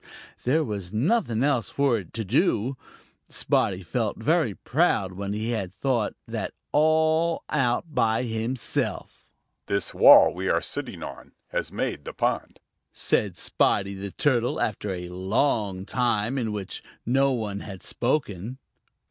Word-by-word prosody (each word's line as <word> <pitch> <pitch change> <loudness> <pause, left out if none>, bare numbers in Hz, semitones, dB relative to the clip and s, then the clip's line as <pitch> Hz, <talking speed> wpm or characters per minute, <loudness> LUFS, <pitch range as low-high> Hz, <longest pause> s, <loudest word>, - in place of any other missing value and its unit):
There 155 +6 +3
was 100 -7 -5
nothing 120 - +1
else 135 -6 +1
for 140 -5 +2
it 90 -5 -11
to 110 - -3
do. 115 +6 +1 0.5
Spotty 95 -1 0
felt 105 +5 -2
very 145 - +1
proud 125 - +1
when 100 +2 -4
he 110 +3 -2
had 100 -6 -2
thought 115 +2 -1
that - - -4
out - - -52 0.2
all 160 +2 +3 0.4
by 115 -6 +1
himself. 115 +1 -2 0.4
"This 100 -1 -1
wall - - +8
we - - -2
are - - +3
sitting - - -6
on - - -9 0.2
has - - -3
made - - -3
the - - -6
pond," - - -1 0.3
said 100 -5 0
Spotty 100 -1 +1
the 100 +1 -5
Turtle, 120 +2 +1
after 105 -1 -2
a 90 -1 -5
long 95 +1 0
time 120 +1 0
in 115 -3 -1
which 100 -3 -5 0.2
no 135 +3 +3
one 105 -5 -3
had 95 -3 -9
spoken. 120 - -1
110 Hz, 140 wpm, -26 LUFS, 100-135 Hz, 0.5 s, wall